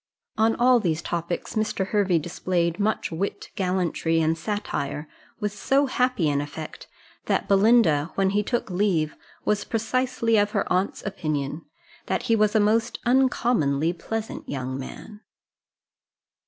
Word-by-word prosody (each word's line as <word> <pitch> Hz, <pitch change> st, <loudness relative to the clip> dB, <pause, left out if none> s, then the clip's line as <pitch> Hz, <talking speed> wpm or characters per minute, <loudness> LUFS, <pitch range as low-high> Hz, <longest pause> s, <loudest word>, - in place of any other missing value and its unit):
On 225 Hz, 0 st, +3 dB
all 245 Hz, 0 st, +5 dB
these 165 Hz, -6 st, -1 dB
topics 170 Hz, 0 st, -3 dB
Mr. 215 Hz, -3 st, -1 dB
Hervey 195 Hz, -5 st, +2 dB
displayed 170 Hz, +2 st, -1 dB
much 210 Hz, -2 st, 0 dB
wit, 185 Hz, +5 st, -3 dB
gallantry, 180 Hz, -3 st, 0 dB
and 160 Hz, 0 st, +2 dB
satire, 160 Hz, -6 st, -3 dB, 0.3 s
with 210 Hz, -2 st, -1 dB
so 270 Hz, +7 st, +2 dB
happy 250 Hz, -, +1 dB
an 145 Hz, -1 st, +1 dB
effect, 145 Hz, +2 st, -8 dB, 0.4 s
that -, -, 0 dB
Belinda, 195 Hz, -7 st, +4 dB
when 195 Hz, -1 st, +2 dB
he 205 Hz, +1 st, +2 dB
took 230 Hz, -1 st, -2 dB
leave, 180 Hz, -5 st, +1 dB, 0.3 s
was 210 Hz, -1 st, +1 dB
precisely 230 Hz, 0 st, 0 dB
of 205 Hz, 0 st, +2 dB
her 200 Hz, -, +1 dB
aunt's 185 Hz, +2 st, 0 dB
opinion, 155 Hz, -5 st, -3 dB, 0.4 s
that -, -, -1 dB
he 230 Hz, -, +2 dB
was 215 Hz, 0 st, +2 dB
a -, -, +6 dB
most 220 Hz, +2 st, +2 dB
uncommonly 235 Hz, -, +2 dB
pleasant 220 Hz, +5 st, -5 dB
young 130 Hz, -2 st, -3 dB
man. 205 Hz, +10 st, -8 dB
195 Hz, 140 wpm, -25 LUFS, 165-220 Hz, 0.4 s, a